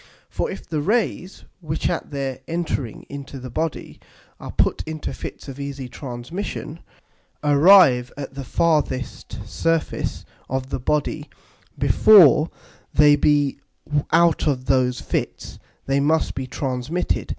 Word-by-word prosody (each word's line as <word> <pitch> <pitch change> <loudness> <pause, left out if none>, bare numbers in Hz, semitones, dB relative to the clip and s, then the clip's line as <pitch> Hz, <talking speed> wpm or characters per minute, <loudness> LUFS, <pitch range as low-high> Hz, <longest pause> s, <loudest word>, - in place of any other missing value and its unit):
For - - -2
if - - -8
the 155 -3 -2
Rays, 200 0 -1 0.2
which 155 -3 -2
at - - -3
their 135 -3 -4
entering 160 -8 -3
into 140 -1 -8
the 130 -1 -8
Body 160 +3 -4 0.4
are - - -7
put - - +1
into 155 -1 -5
Fits - - -8
of 135 0 -8
easy 140 -2 -5
Transmission, 140 +7 -6 0.6
arrive 145 -4 +6
at 135 -2 -6
the 135 0 -6
farthest 145 -4 -1
Surface 165 -1 -1 0.2
of 130 +1 -3
the 135 - -2
Body 150 +3 -1 0.5
before 170 -7 +6 0.4
they 150 -1 +6
be 145 -1 +2 0.5
out 170 -1 +3
of 130 -3 0
those 130 -2 +2
Fits, - - -4 0.3
they 135 0 +1
must 155 +3 +1
be 130 -1 -5
transmitted. 130 +6 -2
145 Hz, 130 wpm, -22 LUFS, 130-160 Hz, 0.6 s, arrive